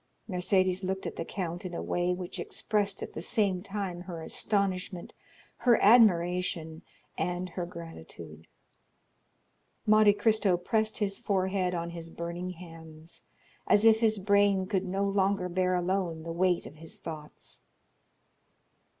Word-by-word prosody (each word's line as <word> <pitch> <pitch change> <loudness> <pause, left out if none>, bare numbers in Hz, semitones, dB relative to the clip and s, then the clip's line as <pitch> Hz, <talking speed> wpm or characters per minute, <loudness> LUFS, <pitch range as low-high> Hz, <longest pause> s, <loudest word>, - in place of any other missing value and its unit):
Mercédès 185 -1 +1
looked 190 +1 -2
at - - -4
the - - -3
count 175 -1 -4
in 180 -2 -5
a - - -3
way 175 0 0
which 180 0 -4
expressed 205 -2 -1
at - - -7
the - - -5
same 190 -1 +1
time 195 -3 -4
her 175 -2 -7
astonishment, 190 -2 -1 0.4
her 240 -2 +4
admiration, 180 -7 +3 0.4
and 180 +1 -2
her 175 0 -4
gratitude. 80 - -10 1.4
Monte 215 -1 +6
Cristo 205 -3 +2
pressed 215 +4 0
his 200 -2 -1
forehead 190 -2 0
on 170 0 -3
his 165 -1 -7
burning 170 +2 -5
hands, 165 -2 -11 0.4
as 205 +2 +4
if 220 -1 +6
his 220 -2 +3
brain 200 -1 +3
could 190 -1 -1
no 195 +2 -1
longer 195 -1 +1
bear 185 +1 +1
alone 180 -2 -1
the 165 - -5
weight 180 0 +1
of 150 - -11
its 165 +1 -8
thoughts. 155 -2 -8
185 Hz, 140 wpm, -29 LUFS, 170-200 Hz, 1.4 s, Monte